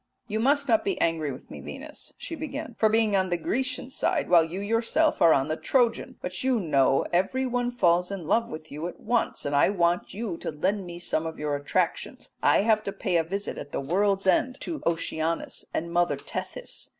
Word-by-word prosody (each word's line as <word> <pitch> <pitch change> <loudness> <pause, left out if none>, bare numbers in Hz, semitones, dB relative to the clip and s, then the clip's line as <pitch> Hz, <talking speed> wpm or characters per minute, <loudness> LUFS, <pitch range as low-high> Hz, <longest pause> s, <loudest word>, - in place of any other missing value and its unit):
"'You 215 0 -2
must 280 +4 +2
not 225 -3 +3
be 195 - -1
angry 160 -3 +1
with 130 - -11
me, - - -8
Venus,' - - -9
she - - -7
began, 310 -3 -5
'for 220 - +5
being 220 -2 +3
on 190 -1 +2
the 175 - +1
Grecian 255 +8 -2
side 335 +3 0
while 170 -2 +7
you 170 +4 -5
are - - -4
yourself 230 +9 +1
on 155 -5 +5
the 155 - -1
Trojan; 235 - +1
but 180 +3 -3
you 260 -3 +2
know 135 -6 +3
every 195 +9 +1
one 245 -1 0
falls 180 -7 +2
in 195 -4 -5
love 230 +8 +2
with 155 0 -8
you 150 +4 -4
at - - -9
once, 240 -1 0
and 145 0 0
I 140 - +5
want 175 -3 +1
you 205 -5 -3
to - - -4
lend 190 +6 -1
me 175 0 -7
some 165 -2 -2
of 160 - -6
your 150 -1 -1
attractions. 145 0 -2
I - - +4
have 215 -1 +3
to 200 - -2
pay 190 -3 -2
a 165 - +2
visit 200 +5 -4
at 145 - -8
the - - -1
world's 195 +7 +1
end 255 +7 +2
to 325 -3 -4
Oceanus 165 0 -2
and 170 +1 -3
Mother 175 0 +2
Tethys. - - -5
190 Hz, 215 wpm, -27 LUFS, 165-235 Hz, -, while